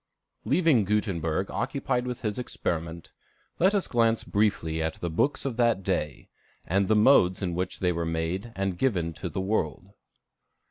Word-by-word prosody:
Leaving 160 - +3
Gutenberg 95 -4 -1
occupied 125 +1 -1
with 125 -1 -5
his 105 0 -2
experiment, 85 -8 -4 0.5
let 190 +4 +4
us 200 - +1
glance 115 -2 +2
briefly 85 -6 0
at 80 0 -2
the 85 - -4
books 135 - 0
of 130 -4 -3
that 115 -5 +2
day, 75 -7 -2 0.4
and 95 +2 +1
the 110 - +3
modes 105 -5 +4
in 90 -2 -1
which 90 +2 -3
they 90 -1 +2
were 85 -1 -2
made 80 +7 -2
and 95 -2 -2
given 90 -11 0
to 85 +3 -5
the 95 - -3
world. 95 -3 -2
95 Hz, 165 wpm, -27 LUFS, 85-115 Hz, 0.5 s, let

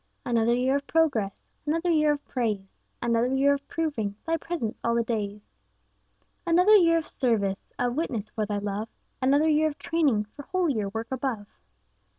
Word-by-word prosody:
Another 235 -1 +2
year 260 +3 +2
of 280 - -7
progress, 275 -12 +1 0.3
Another 330 +3 +1
year 305 -2 +4
of 290 - -7
praise; 210 -6 -2 0.3
Another 235 0 +2
year 280 +1 +4
of 280 0 -5
proving 280 -12 -2
Thy 330 0 +1
presence 325 -9 -4
'all 235 0 +1
the 235 - +2
days.' 210 -3 -3 1.0
Another 360 +5 +5
year 335 -4 +5
of 325 - -3
service, 205 -7 -1
Of 245 -1 0
witness 240 -9 -2
for 215 -2 -2
Thy 205 -1 -1
love; 205 +2 -3 0.3
Another 285 +4 +3
year 310 0 +3
of 300 - -5
training 295 -11 +1
For - - -7
holier 285 - 0
work 225 +4 -5
above. 255 -5 -2
255 Hz, 165 wpm, -27 LUFS, 220-310 Hz, 1.0 s, Another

